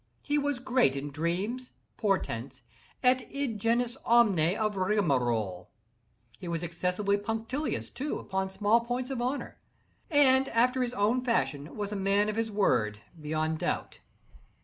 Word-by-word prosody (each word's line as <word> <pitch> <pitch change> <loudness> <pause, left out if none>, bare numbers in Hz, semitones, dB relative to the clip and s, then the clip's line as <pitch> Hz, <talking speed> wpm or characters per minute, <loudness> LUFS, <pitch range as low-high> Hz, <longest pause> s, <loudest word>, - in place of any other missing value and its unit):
He 295 0 +1
was 285 -2 -1
great 250 - +2
in 140 +1 -4
dreams, 185 - -2 0.2
portents, 135 - -2 0.4
et 255 +1 +5
id 275 -6 -2
genus 235 +3 +1
omne 200 -7 +4
of 215 -2 0
rigmarole. 125 - 0 0.7
He 180 - -7
was 170 0 -2
excessively 180 +4 0
punctilious, 225 +8 -3
too, 275 +5 -3
upon 190 0 -2
small 205 +4 +3
points 245 +2 -3
of 255 -3 -2
honor, 255 +4 -3 0.5
and, 270 -3 +5
after 250 +3 +2
his 245 -1 -1
own 230 +4 +1
fashion, 160 - -1
was 205 -1 -3
a - - -3
man 200 +1 +2
of 215 - -2
his 225 0 -1
word, 105 - +1 0.2
beyond 155 +1 -1
doubt. - - -3
210 Hz, 145 wpm, -29 LUFS, 170-245 Hz, 0.7 s, et